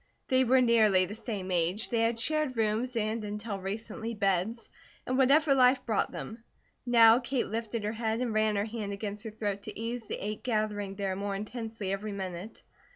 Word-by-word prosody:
They 260 Hz, 0 st, +4 dB
were 260 Hz, +1 st, +4 dB
nearly 215 Hz, -6 st, +5 dB
the 195 Hz, -, -7 dB
same 205 Hz, -4 st, -5 dB
age; 180 Hz, +5 st, 0 dB
they 235 Hz, -, +1 dB
had 230 Hz, 0 st, +1 dB
shared 305 Hz, -1 st, 0 dB
rooms, 225 Hz, +3 st, 0 dB
and, 220 Hz, 0 st, -1 dB
until 210 Hz, 0 st, -4 dB
recently, 220 Hz, +4 st, -5 dB
beds, 200 Hz, +2 st, 0 dB, 0.3 s
and 255 Hz, -, -1 dB
whatever 275 Hz, +3 st, +5 dB
life 255 Hz, 0 st, +4 dB
brought 220 Hz, -3 st, 0 dB
them; 225 Hz, +1 st, -7 dB, 0.4 s
now 230 Hz, -1 st, +7 dB
Kate 255 Hz, 0 st, -1 dB
lifted 225 Hz, 0 st, -3 dB
her 210 Hz, -, -1 dB
head 225 Hz, 0 st, -1 dB
and 245 Hz, -3 st, -1 dB
ran 215 Hz, -1 st, +2 dB
her 200 Hz, +1 st, 0 dB
hand 215 Hz, -2 st, -4 dB
against 205 Hz, +1 st, -5 dB
her -, -, -3 dB
throat 205 Hz, -2 st, -3 dB
to 215 Hz, 0 st, -8 dB
ease 230 Hz, 0 st, -4 dB
the -, -, -2 dB
ache 210 Hz, +1 st, -5 dB
gathering 210 Hz, -4 st, -1 dB
there 195 Hz, -1 st, -2 dB
more 200 Hz, +1 st, -3 dB
intensely 220 Hz, -1 st, -5 dB
every 200 Hz, +2 st, -3 dB
minute. 190 Hz, +1 st, -6 dB
220 Hz, 190 wpm, -30 LUFS, 205-235 Hz, 0.4 s, now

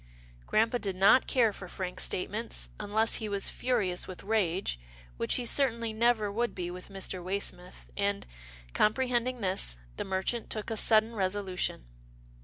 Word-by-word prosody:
Grampa 225 Hz, +3 st, +2 dB
did 195 Hz, -4 st, -2 dB
not 195 Hz, +7 st, +5 dB
care 230 Hz, -5 st, +3 dB
for 190 Hz, -, -9 dB
frank 180 Hz, 0 st, -5 dB
statements, 210 Hz, +5 st, -1 dB
unless 215 Hz, +2 st, +1 dB
he 215 Hz, -2 st, -4 dB
was 200 Hz, -1 st, +2 dB
furious 210 Hz, -8 st, 0 dB
with 185 Hz, -, -8 dB
rage, 195 Hz, -, 0 dB, 0.4 s
which -, -, +1 dB
he 250 Hz, -, 0 dB
certainly 230 Hz, -3 st, +1 dB
never 220 Hz, -2 st, +2 dB
would 235 Hz, +3 st, -1 dB
be 175 Hz, -1 st, -3 dB
with 180 Hz, +2 st, -9 dB
Mr. 190 Hz, -2 st, -5 dB
Waysmith, 185 Hz, -1 st, -3 dB
and, 200 Hz, 0 st, 0 dB, 0.5 s
comprehending 250 Hz, +1 st, +1 dB
this, 185 Hz, -, 0 dB, 0.2 s
the -, -, -2 dB
merchant 190 Hz, +5 st, -2 dB
took 215 Hz, +1 st, -3 dB
a -, -, 0 dB
sudden 220 Hz, +1 st, +4 dB
resolution. 190 Hz, -, -1 dB
205 Hz, 150 wpm, -30 LUFS, 185-230 Hz, 0.5 s, not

